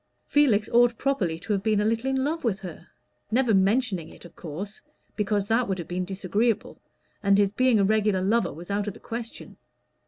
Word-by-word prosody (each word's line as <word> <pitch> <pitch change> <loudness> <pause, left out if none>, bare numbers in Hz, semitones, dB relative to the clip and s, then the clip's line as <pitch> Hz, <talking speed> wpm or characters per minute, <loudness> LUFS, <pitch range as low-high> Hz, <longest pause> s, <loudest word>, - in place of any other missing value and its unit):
Felix 235 -8 +3
ought 240 -1 +4
properly 210 -13 0
to 210 +6 -3
have 195 - 0
been 215 0 +1
a 210 - +1
little 230 +4 0
in 265 0 0
love 320 +3 -2
with 195 -5 -1
her 180 -5 -9 0.4
never 240 0 +2
mentioning 195 -3 +1
it, - - -14
of 170 - -14
course, 185 +6 -7 0.3
because 205 -1 0
that 230 +2 +2
would 190 -1 -1
have 170 - -6
been 180 +1 -2
disagreeable, 200 +4 -1 0.4
and 200 -1 +4
his 200 -1 +3
being 250 0 +3
a - - +4
regular 210 -2 +2
lover 230 +5 +1
was 170 +6 -9
out 205 +1 -1
of 205 - -4
the - - -13
question. 230 0 -7
210 Hz, 205 wpm, -26 LUFS, 190-235 Hz, 0.4 s, ought